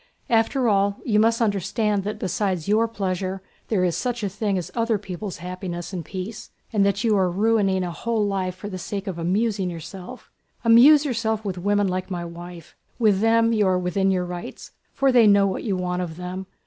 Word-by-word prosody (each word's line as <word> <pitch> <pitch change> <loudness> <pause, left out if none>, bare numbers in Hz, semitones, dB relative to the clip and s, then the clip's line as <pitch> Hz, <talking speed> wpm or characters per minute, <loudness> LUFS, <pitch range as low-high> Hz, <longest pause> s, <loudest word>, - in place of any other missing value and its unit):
"After 235 +3 +2
all, 200 -1 +2
you 210 -3 +2
must 225 +2 +3
understand 205 0 0
that 210 - -3
besides 185 -2 -2
your 220 +3 +3
pleasure 190 -3 -3 0.2
there 200 -5 +1
is 175 -2 +1
such 245 -3 -2
a 200 - 0
thing 200 0 -1
as 180 - -5
other 230 -2 +1
people's 190 0 -6
happiness 180 0 -6
and 175 -3 -4
peace, 190 +6 -7 0.2
and 205 -2 +3
that 200 +2 +1
you 220 -2 +3
are 190 -2 +2
ruining 195 -1 +2
a 175 - -3
whole 225 +4 -1
life 190 -2 -2
for 185 +3 -8
the 185 -2 -6
sake 200 +2 -5
of 185 -4 -5
amusing 195 +2 0
yourself! 180 +8 -9 0.3
Amuse 275 +6 +7
yourself 220 -4 -1
with 185 -3 -3
women 205 +2 +1
like 185 +1 -3
my 175 -2 -4
wife—with 175 +5 -3
them 230 +1 +3
you 210 -3 +2
are 185 -1 +2
within 180 +2 0
your 185 -2 +1
rights, 175 0 -8 0.2
for 275 -1 +2
they 240 -3 +6
know 200 -1 +5
what 195 - -2
you 200 -4 -1
want 180 0 -2
of 165 -2 -5
them. 180 +1 -6
195 Hz, 200 wpm, -23 LUFS, 180-220 Hz, 0.3 s, Amuse